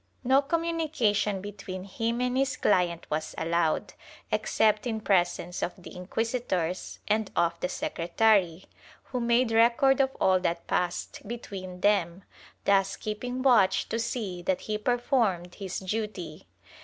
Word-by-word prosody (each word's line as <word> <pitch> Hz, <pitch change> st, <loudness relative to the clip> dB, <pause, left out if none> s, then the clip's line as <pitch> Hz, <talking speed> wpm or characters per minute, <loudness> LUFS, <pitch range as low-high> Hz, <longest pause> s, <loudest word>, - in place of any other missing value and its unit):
No 265 Hz, +2 st, +4 dB
communication 285 Hz, -, 0 dB
between 195 Hz, -2 st, -7 dB
him 230 Hz, +5 st, -2 dB
and 250 Hz, 0 st, 0 dB
his 270 Hz, +1 st, +1 dB
client 175 Hz, -4 st, +1 dB
was 155 Hz, +1 st, -2 dB
allowed, 165 Hz, -1 st, 0 dB, 0.4 s
except 215 Hz, +1 st, +2 dB
in 220 Hz, -2 st, -2 dB
presence 180 Hz, -3 st, 0 dB
of 175 Hz, -, -1 dB
the 180 Hz, -, -12 dB
inquisitors 185 Hz, -2 st, -2 dB
and 215 Hz, -1 st, +1 dB
of 170 Hz, 0 st, +1 dB
the 180 Hz, -, -2 dB
secretary, 180 Hz, 0 st, +1 dB, 0.4 s
who 250 Hz, -, -4 dB
made 235 Hz, 0 st, +2 dB
record 240 Hz, +4 st, +4 dB
of 265 Hz, 0 st, -1 dB
all 185 Hz, -1 st, +4 dB
that 170 Hz, -2 st, -2 dB
passed 180 Hz, 0 st, -2 dB
between 190 Hz, -6 st, -7 dB
them, 195 Hz, -3 st, +2 dB, 0.4 s
thus 195 Hz, -1 st, +3 dB
keeping 245 Hz, +4 st, -4 dB
watch 230 Hz, -8 st, +4 dB
to 230 Hz, -, -1 dB
see 215 Hz, -6 st, -3 dB
that 185 Hz, +1 st, 0 dB
he 210 Hz, -1 st, -3 dB
performed 225 Hz, -7 st, 0 dB
his 190 Hz, -3 st, -5 dB
duty. 190 Hz, -4 st, -4 dB
205 Hz, 135 wpm, -28 LUFS, 180-235 Hz, 0.4 s, No